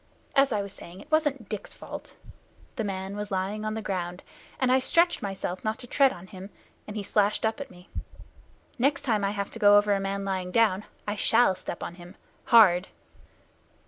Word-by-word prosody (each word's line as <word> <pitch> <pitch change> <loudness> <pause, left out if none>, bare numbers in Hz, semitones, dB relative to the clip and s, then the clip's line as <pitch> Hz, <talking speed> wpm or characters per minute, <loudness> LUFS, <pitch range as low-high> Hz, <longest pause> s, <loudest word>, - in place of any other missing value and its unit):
As 275 0 +5
I 210 -2 0
was 200 0 -8
saying, 175 0 -11
it - - -15
wasn't 295 -7 +1
Dick's 210 0 -6
fault. - - -9 0.6
The 230 - -2
man 195 -1 -4
was 205 0 -4
lying 195 +3 -2
on 215 0 -2
the 220 - -4
ground, 180 -2 -4 0.4
and 260 -1 +2
I 260 - +5
stretched 340 +6 +3
myself 190 -2 -4
not 220 0 -1
to - - -8
tread 270 +2 +4
on 175 - -10
him, 190 0 -10 0.4
and 210 - -7
he 210 - -3
slashed 210 +2 +2
up 220 0 -1
at - - -7
me. 180 0 -16 0.9
Next 280 +3 +2
time 220 -6 +1
I 195 - +2
have 200 -1 -3
to 230 - -6
go 205 -1 +7
over 205 0 +3
a 200 - +1
man 195 0 -3
lying 190 -2 -2
down 210 -2 +2 0.2
I 210 - -2
shall 225 0 +4
step 180 -2 -6
on - - -5
him 175 +1 -12 0.3
hard." 190 -6 +6
205 Hz, 205 wpm, -27 LUFS, 190-225 Hz, 0.9 s, go